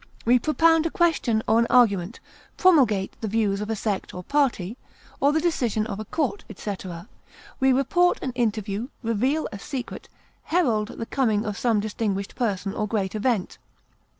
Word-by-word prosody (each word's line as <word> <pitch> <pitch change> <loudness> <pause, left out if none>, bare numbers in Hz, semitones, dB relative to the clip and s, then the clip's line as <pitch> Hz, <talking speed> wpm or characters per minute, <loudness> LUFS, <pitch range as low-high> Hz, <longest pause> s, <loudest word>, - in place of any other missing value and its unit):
We 245 +2 +5
propound 325 +3 +3
a - - -3
question 320 - +1
or 220 +1 +4
an 235 - +2
argument, 210 -4 +3 0.4
promulgate 250 - +4
the 220 - -2
views 205 -2 0
of 210 - -4
a 225 - 0
sect 205 -2 -3
or 180 - -6
party, 240 -7 0 0.4
or 280 - +4
the 315 - +2
decision 245 -10 0
of 200 -2 -5
a 215 - -5
court, 320 - -2
etc. 190 -3 -6 0.5
We 265 -1 +4
report 315 +7 +3
an 260 - -2
interview, 220 -2 -2 0.2
reveal 250 +8 0
a 200 - -7
secret, 265 +1 -6 0.4
herald 240 -12 +1
the 230 -1 -6
coming 225 -5 0
of 210 -1 -3
some 225 -1 +1
distinguished 205 -2 -2
person 200 -4 -1
or 210 - -2
great 200 -3 -1
event. 215 -2 -1
225 Hz, 165 wpm, -24 LUFS, 205-270 Hz, 0.5 s, We